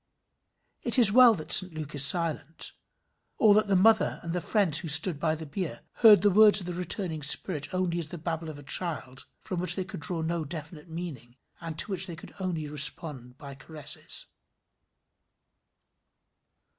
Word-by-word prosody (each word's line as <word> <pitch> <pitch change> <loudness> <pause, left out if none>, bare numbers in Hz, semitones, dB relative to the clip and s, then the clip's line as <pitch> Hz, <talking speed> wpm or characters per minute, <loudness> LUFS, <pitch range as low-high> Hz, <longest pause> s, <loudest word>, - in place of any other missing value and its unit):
It 240 +1 +1
is 230 -6 +6
well 240 0 +5
that 155 -4 -8
St 185 -3 +7
Luke 155 -2 -8
is 145 -2 +4
silent; 165 0 +1 0.7
or 215 -2 +4
that 215 +1 +1
the 200 - 0
mother 220 +4 +2
and 170 0 -6
the 180 - -3
friends 170 -5 0
who 165 - -8
stood 160 +1 +5
by 160 0 -1
the 160 0 -9
bier, 150 -4 -6 0.2
heard 215 -4 +5
the 205 - +3
words 210 +1 +5
of 185 - -8
the 180 - -6
returning 175 -2 -4
spirit 150 +2 0
only 185 -2 -3
as 165 - -5
the 175 - -10
babble 165 0 -6
of 155 - -10
a 145 - -13
child 140 -5 -4
from 185 - -7
which 180 - +3
they 190 - -5
could 190 - -10
draw 160 +1 -2
no 165 0 -3
definite 155 +1 -10
meaning, 150 -8 -9 0.2
and 165 -2 -9
to 205 - -2
which 190 0 -1
they 170 - -8
could 160 - -14
respond 155 -3 -2
only 125 0 -18
by 140 +1 -12
caresses. 145 +2 -4
165 Hz, 180 wpm, -26 LUFS, 150-185 Hz, 0.7 s, St